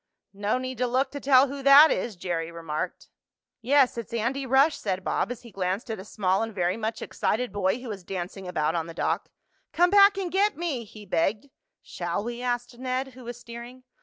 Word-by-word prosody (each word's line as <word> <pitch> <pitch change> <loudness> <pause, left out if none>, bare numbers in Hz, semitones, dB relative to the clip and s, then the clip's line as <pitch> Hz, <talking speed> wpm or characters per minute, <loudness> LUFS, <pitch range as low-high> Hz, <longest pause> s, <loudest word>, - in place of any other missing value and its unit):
"No 205 +4 0
need 255 -1 -5
to 250 - +1
look 260 +2 0
to 285 - -5
tell 270 -1 +5
who 280 +1 -6
that 280 +3 +8
is," 230 -4 -2
Jerry 170 -2 -3
remarked. 165 -2 -5 0.5
"Yes, 260 0 +3
it's 230 - -8
Andy 260 +4 -1
Rush," 275 +4 +4
said 190 -2 -3
Bob, - - -1
as 245 -1 -7
he 235 - -12
glanced 195 +5 -2
at 220 - -4
a - - -7
small 195 -2 0
and 225 -2 -4
very 180 -1 +1
much 225 0 -3
excited 245 0 -1
boy 200 +3 0
who 250 -1 -8
was 200 -4 -6
dancing 185 +1 -6
about 155 -3 0
on 165 -1 -2
the 165 - -9
dock. - - -1 0.4
"Come 355 +1 +4
back 400 0 +7
and 370 -3 -3
get 405 +2 +2
me!" 305 -9 -3
he 210 0 -13
begged. 205 +9 -1 0.3
"Shall 175 +3 -3
we?" 240 +1 -5
asked 245 -1 -3
Ned, 260 +1 -2
who 255 -1 -13
was 240 0 -7
steering. 240 +2 -10
235 Hz, 210 wpm, -26 LUFS, 195-265 Hz, 0.5 s, that